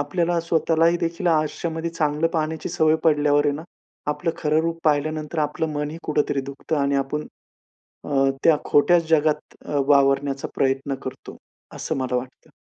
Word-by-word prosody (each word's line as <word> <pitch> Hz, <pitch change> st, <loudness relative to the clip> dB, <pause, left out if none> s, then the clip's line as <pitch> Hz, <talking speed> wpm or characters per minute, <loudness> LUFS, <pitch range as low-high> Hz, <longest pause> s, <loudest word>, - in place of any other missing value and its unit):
आपल्याला 170 Hz, +4 st, 0 dB
स्वतःलाही 165 Hz, 0 st, +2 dB
देखील 170 Hz, +2 st, -3 dB
आयुष्यामध्ये 160 Hz, +1 st, 0 dB
चांगलं 155 Hz, -1 st, 0 dB
पाहण्याची 160 Hz, -1 st, -2 dB
सवय 155 Hz, 0 st, +2 dB
पडल्यावर 150 Hz, -2 st, +3 dB
आहे 145 Hz, -, +1 dB
ना, 155 Hz, -, -6 dB, 0.5 s
आपलं 165 Hz, +3 st, -1 dB
खरं 155 Hz, 0 st, +1 dB
रूप 165 Hz, 0 st, -2 dB
पाहिल्यानंतर 155 Hz, +1 st, 0 dB
आपलं 155 Hz, +1 st, -1 dB
मन 150 Hz, 0 st, -2 dB
ही 160 Hz, -, -7 dB
कुठेतरी 150 Hz, -2 st, 0 dB
दुखतं 140 Hz, +3 st, -4 dB
आणि 140 Hz, 0 st, +1 dB
आपण 140 Hz, +2 st, -2 dB, 0.8 s
अ, -, -, -8 dB, 0.4 s
त्या 165 Hz, -2 st, +6 dB
खोट्याच 165 Hz, +3 st, +3 dB
जगात 155 Hz, -1 st, +1 dB
अ, 145 Hz, -, -2 dB
वावरण्याचा 140 Hz, -1 st, +2 dB
प्रयत्न 135 Hz, +1 st, 0 dB
करतो, 130 Hz, 0 st, -8 dB, 0.4 s
असं -, -, -3 dB
मला 130 Hz, -1 st, -1 dB
वाटतं. 125 Hz, +1 st, -7 dB
150 Hz, 150 wpm, -23 LUFS, 145-165 Hz, 0.8 s, त्या